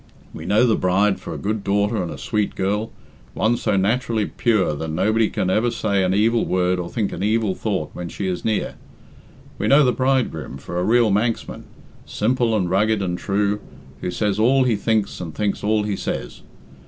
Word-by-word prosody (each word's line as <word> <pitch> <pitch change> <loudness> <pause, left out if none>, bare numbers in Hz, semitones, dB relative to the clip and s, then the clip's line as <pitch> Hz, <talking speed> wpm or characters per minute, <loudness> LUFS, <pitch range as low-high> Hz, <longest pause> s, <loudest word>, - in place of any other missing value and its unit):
We - - -8
know 105 +5 +4
the 115 -3 +3
bride 95 +2 +2
for - - -8
a - - -4
good 105 0 -2
daughter 100 +1 +1
and 90 - -3
a - - -7
sweet 105 -2 -2
girl 105 +3 -1 0.4
one 115 +2 +2
so 105 -4 0
naturally 110 +2 +1
pure 105 -9 +1
that 80 +2 -4
nobody 110 +7 +1
can 95 - -1
ever 110 +5 +2
say 100 -4 0
an 90 - +1
evil 115 +4 +2
word 90 0 +1
or 85 -1 -4
think 110 -4 -2
an - - -5
evil 105 -1 +1
thought 95 -7 -3
when 90 -1 -6
she 100 - -5
is 90 -1 -2
near. 110 -2 -1 0.9
We - - 0
know 140 +1 +6
the 125 - +3
bridegroom 130 - -1
for 85 +6 -5
a - - 0
real 115 +1 +3
Manxman, 110 +3 -1 0.4
simple 115 +1 0
and 95 -4 0
rugged 105 +4 +2
and 90 -2 -1
true, 100 +2 0 0.4
who - - -2
says 105 +2 -1
all 130 +4 +4
he 125 -3 +2
thinks 105 -1 -1
and 80 -3 -7
thinks 105 -2 -1
all 105 0 +2
he 105 -1 -2
says. - - -5
105 Hz, 200 wpm, -21 LUFS, 95-115 Hz, 0.9 s, know